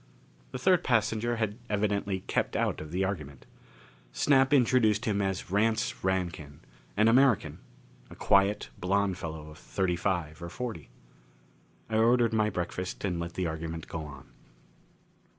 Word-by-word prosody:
The - - -5
third 180 +6 +3
passenger 115 0 +1
had 110 0 -2
evidently 100 -2 0
kept - - -1
out - - 0
of 75 0 -8
the 95 +2 0
argument. 75 -8 -4 0.7
Snap 135 - +3
introduced 120 -6 +3
him 100 -2 +1
as 95 -2 -3
Rance 110 +2 0
Rankin. 85 -6 -2 0.4
An 105 +2 +5
American 125 0 +3 0.5
a - - -11
quiet, 100 -6 +2
blond 95 0 0
fellow 80 -2 -6
of 75 - -14
thirty 95 -2 -1
five 85 -4 -2
or 85 - -6
forty. 115 - -6 1.0
I 110 - -1
ordered 120 0 +4
my 110 -1 +2
breakfast 90 +1 -4
and 90 -3 -1
let 85 0 -5
the 90 - -1
argument 80 0 -4
go 80 - -5
on. 70 -4 -11
100 Hz, 145 wpm, -29 LUFS, 85-110 Hz, 1.0 s, An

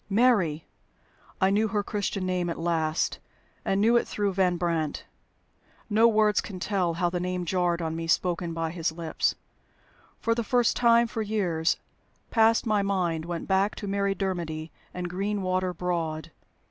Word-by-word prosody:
"Mary"! 195 -9 +3 0.7
I 190 0 +3
knew 215 +2 +2
her 205 0 -1
Christian 200 -2 -2
name 180 -1 -1
at 170 - -3
last, 165 -1 0 0.4
and 195 - +1
knew 230 +3 +5
it - - 0
through 205 -2 -1
Van 180 -2 +2
Brandt. 165 -4 -1 0.9
No 220 +2 +6
words 215 -2 +3
can 190 -3 -8
tell 180 -3 0
how 175 0 0
the 180 - -1
name 180 0 -2
jarred 175 -1 0
on 160 0 -2
me, 165 0 -4
spoken 175 0 +1
by 165 -1 -2
his 165 -2 -1
lips. 160 -1 -1 0.8
For 230 - +1
the 235 0 -1
first 245 +1 +2
time 235 0 +5
for 230 -1 -4
years 185 -7 0 0.5
past 225 0 +4
my 215 -2 +2
mind 180 -5 0
went 170 -1 -4
back 195 +2 +2
to 205 - -6
Mary 200 0 0
Dermody 170 -5 -3 0.2
and 180 0 -4
Greenwater 185 -1 -1
Broad. 165 -3 -3
185 Hz, 160 wpm, -27 LUFS, 170-205 Hz, 0.9 s, No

